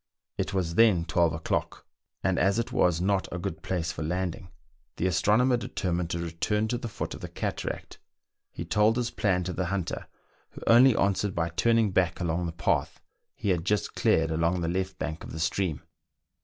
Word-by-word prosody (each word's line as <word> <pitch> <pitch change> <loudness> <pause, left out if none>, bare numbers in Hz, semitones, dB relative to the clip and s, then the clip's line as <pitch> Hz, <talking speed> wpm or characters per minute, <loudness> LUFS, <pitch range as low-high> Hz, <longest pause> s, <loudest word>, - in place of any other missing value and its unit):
It - - -2
was 90 -4 -1
then 95 -4 +4
twelve 85 -2 +2
o'clock, 80 0 -3 0.4
and 95 0 +1
as 100 +2 +3
it 115 - -1
was 90 -2 +2
not 95 +1 0
a 85 - -3
good 85 -3 -5
place 85 -3 -2
for 80 - -7
landing, 90 +2 -3 0.5
the - - -2
astronomer 105 +8 +3
determined 90 -5 -2
to 85 - -2
return 85 +6 -1
to 120 - -1
the 120 - -5
foot 105 - -5
of - - -9
the - - -6
cataract: - - -4 0.5
he - - -6
told 105 +2 +3
his 120 -1 -1
plan 90 -3 +1
to 90 +1 -3
the 90 0 -2
hunter, 95 -2 -3 0.5
who - - -10
only 120 +1 +7
answered 100 0 +1
by 85 0 0
turning 115 +4 +2
back 90 -2 +1
along 85 -1 -1
the - - -3
path 80 -1 -1 0.4
he 105 - -3
had 85 -3 +1
just 105 +1 0
cleared 80 0 +2
along 85 +3 +1
the 85 - -1
left 95 +2 -2
bank 80 -1 -4
of - - -9
the 80 - -5
stream. 85 -1 -1
90 Hz, 195 wpm, -28 LUFS, 85-100 Hz, 0.5 s, only